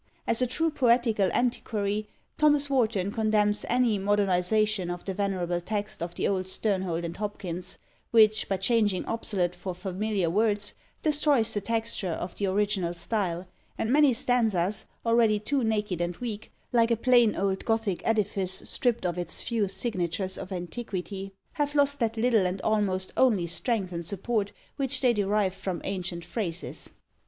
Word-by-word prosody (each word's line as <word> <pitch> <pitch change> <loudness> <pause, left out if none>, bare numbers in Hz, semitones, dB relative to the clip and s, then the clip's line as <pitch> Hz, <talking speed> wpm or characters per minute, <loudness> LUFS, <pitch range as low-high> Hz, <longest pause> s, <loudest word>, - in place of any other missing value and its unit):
As 230 - +2
a 250 - +3
true 325 +6 0
poetical 235 -7 +3
antiquary, 215 -4 -1 0.3
Thomas 295 -2 +4
Warton 215 -7 +1
condemns 210 -1 +1
any 240 -4 +2
modernisation 200 0 +2
of 175 0 -6
the 195 - -2
venerable 180 -3 -1
text 205 +1 -3
of 170 0 -4
the - - 0
old 185 -2 -1
Sternhold 185 -4 -1
and 170 - -5
Hopkins, 185 -3 -5 0.3
which, 220 -1 +4
by 195 - +1
changing 205 -1 +2
obsolete 195 -6 -1
for 180 0 -6
familiar 190 +1 -1
words, 205 +3 +1 0.3
destroys 290 -7 +3
the 205 - -1
texture 225 -3 -2
of 175 +2 -4
the 200 - -1
original 190 -3 0
style; 175 -1 -2 0.3
and 225 +3 0
many 295 -2 +6
stanzas, 220 -6 +1 0.2
already 230 -2 +4
too 260 +6 -1
naked 210 -5 0
and 175 0 -2
weak, 220 -4 -6 0.2
like 230 -1 +4
a 235 - +2
plain 240 -2 +4
old 195 0 -1
Gothic 225 -5 0
edifice 200 -4 -1
stripped 240 -6 0
of 175 0 -1
its 175 - -1
few 225 -4 0
signatures 190 -2 -2
of 185 - -8
antiquity, 190 +1 -5 0.2
have 290 -1 -1
lost 285 0 +2
that 230 -1 0
little 225 -4 +3
and 185 +2 -3
almost 195 -3 0
only 220 -9 +3
strength 195 +2 -1
and 170 -1 -4
support 205 +3 -2 0.3
which 270 -2 0
they 250 -3 +4
derived 205 -2 +1
from 190 -2 -3
ancient 180 -3 -4
phrases. 180 -3 -4
205 Hz, 155 wpm, -27 LUFS, 185-230 Hz, 0.3 s, many